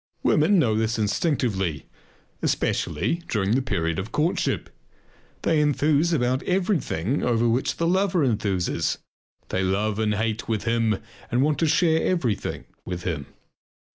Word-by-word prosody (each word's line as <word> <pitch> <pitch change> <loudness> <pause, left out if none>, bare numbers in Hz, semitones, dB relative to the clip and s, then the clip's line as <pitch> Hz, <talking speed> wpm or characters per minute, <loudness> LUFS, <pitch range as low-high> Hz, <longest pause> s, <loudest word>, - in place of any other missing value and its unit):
Women 165 +7 +4
know 125 -10 +3
this 110 +2 0
instinctively, 105 - 0 0.6
especially 170 - 0
during 105 - 0
the 130 +4 +3
period 85 -10 -1
of 100 +4 -5
courtship. 160 +4 0 0.7
They 160 -2 +3
enthuse 150 +2 +2
about 130 -4 +1
everything 160 - 0
over 120 -1 +2
which 120 +3 0
the 165 - 0
lover 180 -2 +2
enthuses; 100 -6 0 0.5
they 95 - 0
love 100 +3 0
and 105 -1 +1
hate 110 +1 -2
with 110 -3 -1
him 115 -2 +1 0.3
and 125 +2 +2
want 150 0 +1
to 165 - +2
share 160 +1 +3
everything 125 - -1 0.2
with 90 -1 -5
him. 75 -6 -3
120 Hz, 140 wpm, -24 LUFS, 105-155 Hz, 0.7 s, Women